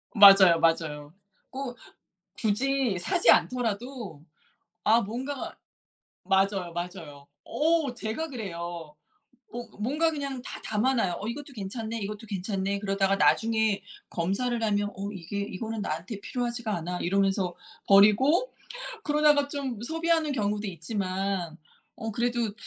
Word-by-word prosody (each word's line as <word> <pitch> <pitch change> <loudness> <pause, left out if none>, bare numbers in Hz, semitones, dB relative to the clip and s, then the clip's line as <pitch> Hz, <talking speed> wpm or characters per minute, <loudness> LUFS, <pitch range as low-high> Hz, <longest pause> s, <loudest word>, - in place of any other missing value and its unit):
맞아요, 195 -4 +9
맞아요. 155 -3 0 0.4
꼭 260 -2 -6 0.6
굳이 245 0 +1
사지 350 - +1
않더라도 230 - 0 0.6
아 225 +2 +5
뭔가가 255 +7 -5 0.7
맞아요, 190 -2 +1
맞아요. 165 -5 -7 0.2
어 315 -4 +1
제가 235 +8 -3
그래요. 170 - -6 0.6
어 240 0 -5
뭔가 300 +9 +1
그냥 280 -4 -4
다 - - -8
담아놔요. 220 -3 +1
'어 210 - -4
이것도 285 +3 -6
괜찮네, 220 +2 -4
이것도 210 +2 -5
괜찮네.' 195 0 -2
그러다가 195 -1 +1
나중에 220 -2 +2 0.3
검사를 225 +8 -1
하면 205 -1 +1
'어 200 +2 -4
이게 195 +2 -5
이거는 220 +2 -4
나한테 180 +7 -4
필요하지가 240 -2 -3
않아.' 175 +2 -4
이러면서 195 -1 +1 0.3
버리고 220 - +5 0.5
그러다가 295 -1 +4
좀 270 -6 -4
소비하는 325 +1 +1
경우도 210 -3 -1
있지만 185 -1 -3 0.4
어 225 -2 -4
그래도 235 -1 0
210 Hz, 285 characters per minute, -27 LUFS, 190-250 Hz, 0.7 s, 맞아요